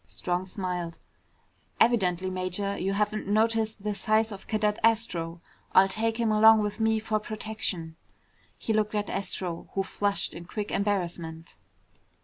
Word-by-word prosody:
Strong 180 +1 -2
smiled. 180 -3 -4 0.8
"Evidently, 185 -6 +3
Major, 185 +2 -2
you 195 +2 -1
haven't 210 +1 -1
noticed 220 0 +1
the 210 0 -1
size 215 +2 +2
of 195 -2 -9
Cadet 210 -1 +1
Astro. 180 -7 +1 0.3
I'll 190 +1 +7
take 225 +3 -1
him 230 -2 +2
along 220 +1 +7
with 210 +1 -3
me 220 0 +3
for 215 0 -1
protection." 210 -7 -4 0.6
He 220 - -1
looked 215 0 +1
at 205 -1 -1
Astro, 180 -3 -3
who 195 - +1
flushed 200 +1 -1
in 170 - -8
quick 205 +3 -4
embarrassment. 170 - -2
205 Hz, 140 wpm, -28 LUFS, 185-215 Hz, 0.8 s, I'll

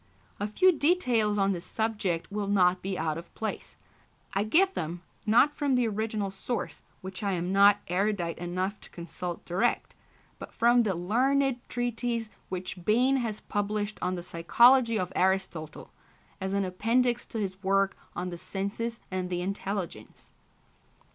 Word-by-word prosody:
A 205 - -1
few 370 - +4
details 255 -11 +2
on 195 0 +3
this 175 -3 -3
subject 210 -7 -2
will 205 -1 -2
not 185 -2 +3
be 190 -1 -3
out 160 0 -1
of 170 - -13
place. 220 - -5 0.6
I 195 - +1
give 375 - +3
them, 170 +1 -4 0.2
not 245 +7 +5
from 285 -3 +1
the 245 -2 +2
original 215 -2 -2
source, 225 +5 -4 0.2
which 190 +2 -7
I 200 -2 0
am 180 +1 -2
not 200 +1 +6
erudite 180 -2 -1
enough 185 +4 -3
to - - -13
consult 175 0 -6
direct, 185 +8 0 0.5
but - - -8
from 240 +1 +5
the 205 -5 0
learned 255 +8 +1
treatise 240 -2 -2 0.2
which 185 -1 -5
Bain 250 +7 +3
has 225 -4 -3
published 205 0 -2
on 180 +1 0
the 175 - -6
psychology 230 +8 +4
of 185 -2 -3
Aristotle, 185 -5 -1 0.5
as 190 +1 -2
an 200 -1 +1
appendix 235 +6 +1
to 230 - -6
his 190 -3 -3
work 195 0 +2 0.2
on 180 +1 -3
the 175 - -7
Senses 215 +5 -4
and 185 -1 -2
the 175 -1 -2
Intelligence. 195 -1 -5
200 Hz, 155 wpm, -28 LUFS, 185-230 Hz, 0.6 s, not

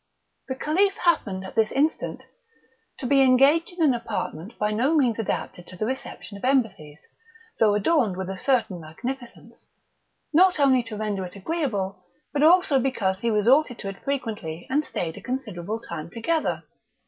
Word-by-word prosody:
The 260 - -3
Caliph 375 +9 +1
happened 200 - +1
at 190 - -8
this 220 -1 +2
instant 300 +4 -1 0.7
to 270 - -6
be 275 +2 +4
engaged 275 +6 +4
in 350 -2 -1
an 285 -4 +5
apartment 215 -5 -5
by 210 0 0
no 255 +9 +2
means 245 -7 +2
adapted 175 -3 -3
to 185 - -11
the 215 - -1
reception 230 -4 -6
of - - -18
embassies, 210 - 0 0.6
though 210 -2 +4
adorned 215 - +2
with 190 -1 -4
a 190 - -4
certain 215 -5 0
magnificence, 240 +11 -8 0.7
not 365 +1 +5
only 265 -3 +5
to 225 -2 -7
render 205 -3 -2
it 180 +1 -8
agreeable, 200 - -2 0.3
but 290 - 0
also 325 -3 +5
because 210 -8 0
he 235 - 0
resorted 245 +5 +3
to 195 - -5
it 195 - -10
frequently, 215 - -4
and 295 +3 +2
stayed 165 - -4
a - - -9
considerable 220 -6 -4
time 170 -7 -7
together. 310 - -1
230 Hz, 165 wpm, -25 LUFS, 195-275 Hz, 0.7 s, an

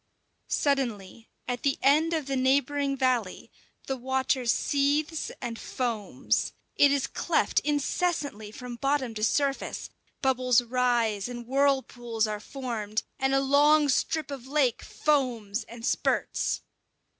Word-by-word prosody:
Suddenly, 230 -7 -1 0.2
at 245 -1 -2
the 275 -1 +1
end 305 +4 +4
of 315 -3 -1
the 275 0 -2
neighbouring 275 +1 +1
valley, 250 -7 0 0.3
the 270 - -2
water 260 0 -1
seethes 290 +5 +1
and 235 -2 -5
foams. 205 - -2 0.2
It 285 - +6
is 280 -2 +1
cleft - - +1
incessantly 290 - -1
from 245 +2 -8
bottom 275 -2 0
to 215 -1 -5
surface, 275 +4 0 0.3
bubbles 255 -2 +3
rise 240 -3 +1
and 240 -1 -7
whirlpools 255 -4 +1
are 210 -1 -3
formed, 225 -4 -4 0.2
and 270 0 +2
a - - +4
long 290 +2 +4
strip 290 +3 0
of 265 -2 -7
lake 270 -4 +1
foams 240 -7 0
and 230 0 -9
spurts. - - 0
260 Hz, 125 wpm, -27 LUFS, 235-280 Hz, 0.3 s, It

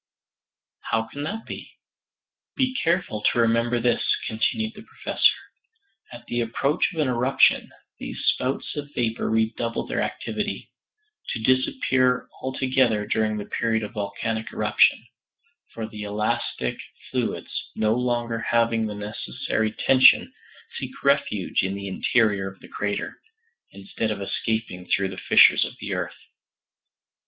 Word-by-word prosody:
"How 110 0 +2
can 125 +6 -8
that 220 +6 -5
be?" - - -8 0.8
"Be 260 -1 0
careful 165 - 0
to - - +2
remember 115 +1 +2
this," 120 0 +1 0.2
continued 220 - -1
the 210 - -11
Professor. 220 - +1 0.8
"At 120 -1 -11
the 120 0 -1
approach 135 - +1
of 165 - -6
an 150 - +2
eruption 125 +2 +3 0.3
these - - -6
spouts 130 +2 0
of 145 -1 -5
vapor 115 -2 -1
redouble 110 +1 0
their - - -2
activity - - -4 0.6
to 110 - -3
disappear 130 - +2
altogether 130 -5 +1
during 110 0 0
the 105 - -4
period 110 -1 0
of 105 - -6
volcanic 110 +1 -3
eruption; 105 +2 +3 0.7
for 115 - -5
the 105 -1 -9
elastic 105 - -2 0.3
fluids, - - -3
no 110 0 +2
longer 120 -1 -1
having 115 -1 +1
the 105 - -5
necessary 105 +1 -2
tension, 130 +4 +5 0.5
seek - - -6
refuge - - +2
in 95 +1 -2
the 100 0 -5
interior 100 -1 +1
of 95 - -19
the - - -13
crater, 100 0 -3 0.5
instead 100 +3 -4
of 105 - -2
escaping 100 -2 -3
through 95 -1 +1
the 95 - -8
fissures - - +7
of - - -5
the - - -4
earth. - - -3
115 Hz, 135 wpm, -24 LUFS, 105-125 Hz, 0.8 s, fissures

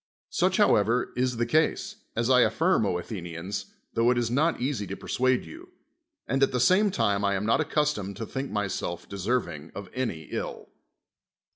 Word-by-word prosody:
Such, - - +2
however, 115 +4 +3
is 125 -1 0
the 120 - +1
case, 160 - +1 0.2
as 115 0 +1
I 125 -1 +6
affirm, 110 - +3
O 90 - 0
Athenians, 90 +1 -5 0.3
tho 115 +1 +3
it 125 - +3
is 120 -1 0
not 155 +6 +2
easy 125 -5 -2
to 100 - -5
persuade 130 0 +1
you. 340 +3 -11 0.6
And 135 +1 0
at 135 - +4
the 125 - 0
same 185 - +4
time 105 - +1
I 100 0 +2
am 95 +2 -2
not 110 - +3
accustomed 105 -11 -1
to 115 - -4
think 135 +4 -4
myself 100 -4 -3
deserving 95 -7 -2
of 100 -2 -7
any 115 -11 -2
ill. - - -5
115 Hz, 175 wpm, -27 LUFS, 100-130 Hz, 0.6 s, I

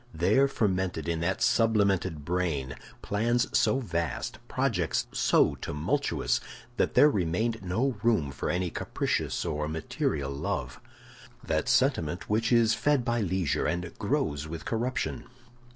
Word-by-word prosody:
There 100 +12 +3
fermented 95 - -1
in 85 -1 -1
that 90 +3 0
sublimated 100 -8 +2
brain 80 -7 -1 0.3
plans 115 +4 0
so 130 - +3
vast, 85 -9 -3
projects - - 0
so - - +3
tumultuous, 75 +1 -1 0.4
that - - +1
there 150 - +8
remained 110 - 0
no 115 +8 0
room 110 -12 +2
for - - -4
any 90 -1 -1
capricious - - -2
or 75 -2 -2
material 75 -3 -2
love—that 65 -2 -5
sentiment - - +1
which 110 +3 +1
is 115 -2 +5
fed 140 +1 +1
by 120 -2 +1
leisure 95 -5 0
and 90 +1 -3
grows 75 +1 -1
with 80 -1 -7
corruption. 125 +4 -2
95 Hz, 125 wpm, -28 LUFS, 80-115 Hz, 0.4 s, there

